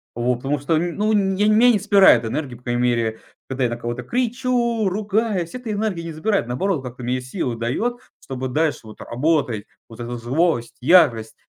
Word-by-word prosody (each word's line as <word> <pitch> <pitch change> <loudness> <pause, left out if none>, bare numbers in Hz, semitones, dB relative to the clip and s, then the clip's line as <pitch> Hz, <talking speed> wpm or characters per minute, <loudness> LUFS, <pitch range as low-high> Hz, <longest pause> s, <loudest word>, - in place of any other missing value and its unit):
вот. 120 +2 0
Потому 140 +3 -2
что, 150 +4 0
ну, 175 +6 -1
нь 195 -2 +1
я 210 - +3
мя 225 +3 +5
не 215 - +2
вспирает 190 - +5
энергии, 130 +2 -4
по 120 - -18
крайней 120 0 -1
мере, 115 -2 0 0.3
когда 130 0 -2
я - - 0
на 120 - -3
кого-то 120 +1 -5
кричу, 240 - 0
ругаюсь, 205 -2 -1
эта 245 -3 -5
энергия 205 -5 -2
не 165 - -6
забирает, 195 - 0
наоборот, 145 +5 -1
как-то 125 0 -8
мне 125 +1 -1
силу 130 -1 -3
дает, 125 - -2 0.3
чтобы 130 -1 -5
дальше 155 +4 0
вот 110 - -12
работать. 125 -5 -1 0.2
Вот 115 - -13
эта 120 +1 -5
злость, 120 -1 -1
ярость. 130 -7 +4
150 Hz, 190 wpm, -21 LUFS, 120-205 Hz, 0.3 s, мя